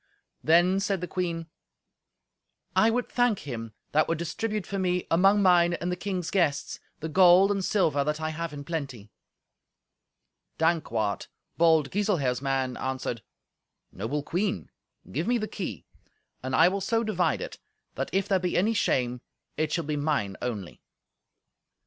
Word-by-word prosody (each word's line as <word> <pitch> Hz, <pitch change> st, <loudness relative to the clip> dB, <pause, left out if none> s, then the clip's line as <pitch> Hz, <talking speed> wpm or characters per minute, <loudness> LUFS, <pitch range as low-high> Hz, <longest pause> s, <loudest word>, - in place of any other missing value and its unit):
Then 175 Hz, +4 st, +4 dB
said 195 Hz, -1 st, 0 dB
the 180 Hz, -, -4 dB
queen, 170 Hz, -3 st, -2 dB, 1.3 s
"I 220 Hz, -, +5 dB
would 245 Hz, +2 st, 0 dB
thank 245 Hz, -4 st, +1 dB
him 115 Hz, -5 st, -6 dB, 0.2 s
that 155 Hz, +1 st, +3 dB
would 165 Hz, -, 0 dB
distribute 205 Hz, +5 st, -3 dB
for 195 Hz, -, -4 dB
me, 180 Hz, -1 st, 0 dB
among 195 Hz, +4 st, +4 dB
mine 175 Hz, -2 st, +5 dB
and 175 Hz, +1 st, -3 dB
the -, -, 0 dB
king's 180 Hz, -2 st, -3 dB
guests, 155 Hz, -7 st, 0 dB, 0.2 s
the 160 Hz, -, -3 dB
gold 185 Hz, +3 st, +6 dB
and 195 Hz, -1 st, -1 dB
silver 160 Hz, -9 st, +2 dB
that 150 Hz, +2 st, -1 dB
I 155 Hz, 0 st, -2 dB
have 165 Hz, 0 st, -4 dB
in 145 Hz, -1 st, -7 dB
plenty." 135 Hz, -10 st, -5 dB, 1.5 s
Dankwart, 120 Hz, -11 st, 0 dB, 0.3 s
bold 160 Hz, -4 st, +3 dB
Giselher's 175 Hz, -12 st, 0 dB
man, 135 Hz, -2 st, -1 dB
answered, 130 Hz, -3 st, -3 dB, 0.7 s
"Noble 125 Hz, +10 st, -3 dB
Queen, 190 Hz, +6 st, -2 dB, 0.4 s
give 160 Hz, +6 st, -2 dB
me 245 Hz, 0 st, +3 dB
the 215 Hz, -2 st, -3 dB
key, 170 Hz, -, -6 dB, 0.6 s
and 130 Hz, 0 st, -2 dB
I 165 Hz, -, +6 dB
will 195 Hz, +2 st, -1 dB
so 225 Hz, +4 st, +1 dB
divide 185 Hz, -6 st, 0 dB
it -, -, -7 dB, 0.3 s
that, -, -, -3 dB
if 195 Hz, 0 st, 0 dB
there 190 Hz, -2 st, +2 dB
be 180 Hz, -1 st, -1 dB
any 215 Hz, +5 st, +2 dB
shame, 125 Hz, -, 0 dB, 0.3 s
it 155 Hz, -1 st, -1 dB
shall 170 Hz, -1 st, -1 dB
be 150 Hz, 0 st, -2 dB
mine 145 Hz, -10 st, -1 dB
only." 110 Hz, -7 st, -5 dB
170 Hz, 155 wpm, -27 LUFS, 140-190 Hz, 1.5 s, gold